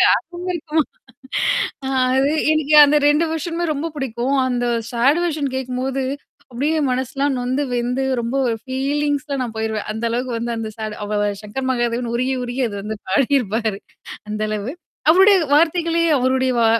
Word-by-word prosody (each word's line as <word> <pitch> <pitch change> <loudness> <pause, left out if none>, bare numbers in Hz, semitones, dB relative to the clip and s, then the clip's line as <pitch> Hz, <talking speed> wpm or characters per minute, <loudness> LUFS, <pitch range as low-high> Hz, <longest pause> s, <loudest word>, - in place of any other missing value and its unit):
ஆர்வம் 355 +1 -5
இருக்குமா. 315 -2 0 1.0
அ - - -1 0.3
அது 270 +2 +3 0.2
எனக்கு 310 -1 +1
அந்த 295 +1 +4 0.4
வெர்ஷனுமே 335 +2 -2
ரொம்ப 310 +4 -3
புடிக்கும். 265 0 -1
அந்த 245 -1 -1 0.3
சாடுவெர்ஷன் 285 +3 +1
கேக்கும்போது 260 +1 -2 0.5
அப்பிடியே 290 +6 0
மனசுலாம் 265 +2 -1
நொந்து, 255 +3 -1
வெந்து 245 +2 -1 0.2
ரொம்ப 235 +2 -3
ஒரு 230 -2 0
ஃபீலிங்ஸ்ல 285 +2 -1
நான் 240 -3 -3
போயிருவேன். 220 -1 -2
அந்த 220 - -6
அளவுக்கு 245 +2 -2
வந்து 235 +1 -3
அந்த 225 -1 -4
சாடு 215 -1 -4
அவ 210 +1 -2 0.3
சங்கர் 260 +6 -4
மகாதேவன் 240 -1 -1
உருகி, 255 +2 0
உருகி 245 +2 -3
அது 205 - -6
வந்து 215 +2 -4
பாடியிருப்பாரு. 225 -2 +1 0.5
அந்த 215 0 -3
அளவு. 215 +3 -3 0.4
அவருடைய 385 +4 +7 0.2
வார்த்தைகளே 335 +2 +3 0.2
அவருடைய 260 0 +1
வா - - +4
260 Hz, 145 wpm, -20 LUFS, 235-290 Hz, 1.0 s, அவருடைய